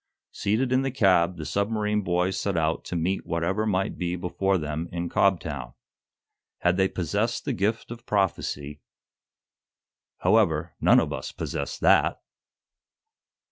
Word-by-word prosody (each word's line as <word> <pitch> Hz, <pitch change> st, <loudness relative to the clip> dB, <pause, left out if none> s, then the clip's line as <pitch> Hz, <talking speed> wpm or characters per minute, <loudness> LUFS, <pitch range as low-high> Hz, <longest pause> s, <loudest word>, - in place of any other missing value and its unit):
Seated 115 Hz, +6 st, 0 dB
in 130 Hz, +1 st, +3 dB
the 135 Hz, -, -1 dB
cab 95 Hz, -8 st, +3 dB
the 80 Hz, -, -6 dB
submarine 105 Hz, +2 st, 0 dB
boys 90 Hz, 0 st, 0 dB
set 100 Hz, -3 st, -1 dB
out 80 Hz, 0 st, 0 dB
to -, -, -5 dB
meet 90 Hz, +3 st, -1 dB
whatever 90 Hz, +6 st, -1 dB
might 95 Hz, -2 st, -1 dB
be 90 Hz, -1 st, -1 dB
before 95 Hz, +2 st, 0 dB
them 80 Hz, +1 st, -4 dB
in 85 Hz, 0 st, -3 dB
Cobtown. 70 Hz, -10 st, 0 dB, 0.9 s
Had 90 Hz, 0 st, +3 dB
they 95 Hz, 0 st, +4 dB
possessed 100 Hz, +7 st, -2 dB
the 140 Hz, -, -1 dB
gift 110 Hz, +2 st, -1 dB
of 120 Hz, +1 st, -9 dB
prophecy 75 Hz, -7 st, -1 dB, 1.4 s
However, 85 Hz, -7 st, +2 dB
none -, -, +6 dB
of -, -, -1 dB
us -, -, -5 dB
possess 70 Hz, -, -4 dB
that! -, -, +3 dB
95 Hz, 140 wpm, -26 LUFS, 85-105 Hz, 1.4 s, none